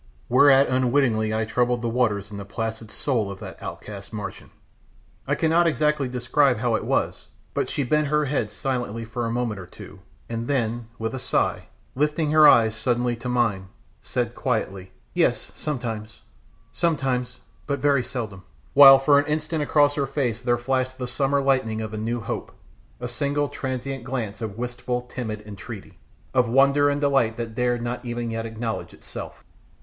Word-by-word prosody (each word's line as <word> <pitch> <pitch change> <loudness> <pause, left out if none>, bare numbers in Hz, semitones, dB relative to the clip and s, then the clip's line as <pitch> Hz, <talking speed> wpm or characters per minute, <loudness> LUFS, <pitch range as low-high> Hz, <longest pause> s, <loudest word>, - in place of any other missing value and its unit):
Whereat 135 +2 +6
unwittingly 125 -4 +2
I 110 0 0
troubled 120 +1 0
the - - 0
waters 110 -4 0
in 100 - -6
the 100 - -5
placid 110 +2 -5
soul 115 -7 -1
of 100 -1 -7
that 95 -3 -9
outcast - - -8
Martian! - - -7 0.8
I - - +2
cannot 165 +2 +3
exactly 150 -3 +1
describe 125 +2 +2
how 120 +1 0
it 110 - 0
was, - - -1 0.3
but - - -1
she 145 - -1
bent 150 +4 +1
her 150 +1 +2
head 135 -6 -1
silently 120 -2 -3
for 115 +1 -3
a - - -2
moment 115 -4 -1
or 90 - -9
two, - - -12 0.3
and 115 0 -4
then, 120 -4 -1
with 115 +2 -3
a 130 - -3
sigh, 125 - 0 0.3
lifting 150 +2 0
her 155 -1 +8
eyes 110 -2 +6
suddenly 120 +1 0
to 120 +2 -5
mine, 115 -6 +1 0.3
said 120 -2 -2
quietly, 100 -7 -2 0.2
"Yes, - - +1
sometimes; 115 -7 -5 0.5
sometimes 130 -3 0 0.3
but 140 -1 0
very 140 -2 +2
seldom," 115 -7 -5 0.3
while 135 -1 +10
for 140 +1 +5
an 145 - -1
instant 155 +1 -1
across 145 -1 +3
her 140 -2 -1
face 125 -4 -1
there 120 -1 +2
flashed 130 +1 -1
the 125 - -3
summer 140 +2 +1
lightning 130 -5 +1
of 110 0 -5
a - - -3
new 115 +3 -2
hope, - - -4 0.5
a 125 - -4
single 145 +3 -1
transient 130 0 -4
glance 120 -5 -4
of 110 -2 -5
wistful, 125 0 -3
timid 115 -4 -5
entreaty; 100 -2 -9 0.3
of 125 -3 +3
wonder 140 +3 +4
and 145 0 -1
delight 135 -6 +2
that 115 -1 -4
dared 120 0 0
not 120 +1 -3
even 120 -1 -3
yet 115 0 -3
acknowledge 115 0 -4
itself. - - -9
125 Hz, 175 wpm, -24 LUFS, 115-140 Hz, 0.8 s, while